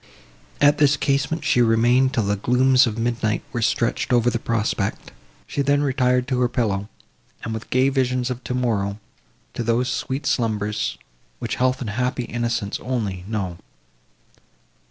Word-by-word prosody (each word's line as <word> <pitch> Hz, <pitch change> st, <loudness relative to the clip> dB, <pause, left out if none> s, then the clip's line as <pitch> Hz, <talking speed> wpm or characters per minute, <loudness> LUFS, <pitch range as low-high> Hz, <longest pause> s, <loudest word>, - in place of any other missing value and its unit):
At 145 Hz, 0 st, +4 dB
this 145 Hz, -1 st, +4 dB
casement, 140 Hz, +4 st, 0 dB
she 125 Hz, -, +3 dB
remained 120 Hz, +3 st, +4 dB
till 115 Hz, -, +2 dB
the 100 Hz, 0 st, 0 dB
glooms 125 Hz, +4 st, +4 dB
of 110 Hz, -1 st, -3 dB
midnight 115 Hz, -2 st, -1 dB
were 120 Hz, -, -1 dB
stretched 115 Hz, +2 st, 0 dB
over 120 Hz, 0 st, +3 dB
the 115 Hz, -, -1 dB
prospect. 110 Hz, -4 st, -2 dB, 0.3 s
She 140 Hz, -, -2 dB
then 145 Hz, +1 st, +2 dB
retired 125 Hz, -2 st, +1 dB
to 130 Hz, -2 st, 0 dB
her 125 Hz, -1 st, +2 dB
pillow, 105 Hz, -5 st, -1 dB, 0.5 s
and, 115 Hz, -, -3 dB
"with 110 Hz, 0 st, -6 dB
gay 130 Hz, +1 st, +3 dB
visions 130 Hz, -2 st, 0 dB
of 125 Hz, 0 st, -6 dB
tomorrow," 110 Hz, -6 st, -1 dB, 0.6 s
to -, -, -4 dB
those 120 Hz, +2 st, +1 dB
sweet 135 Hz, +3 st, -3 dB
slumbers, 105 Hz, -, -1 dB, 0.4 s
which -, -, -4 dB
health 130 Hz, +1 st, +1 dB
and 110 Hz, -4 st, -3 dB
happy 125 Hz, +2 st, -1 dB
innocence 120 Hz, -3 st, -2 dB
only 105 Hz, -8 st, -3 dB
know. 95 Hz, -5 st, -3 dB
120 Hz, 155 wpm, -22 LUFS, 110-130 Hz, 0.6 s, At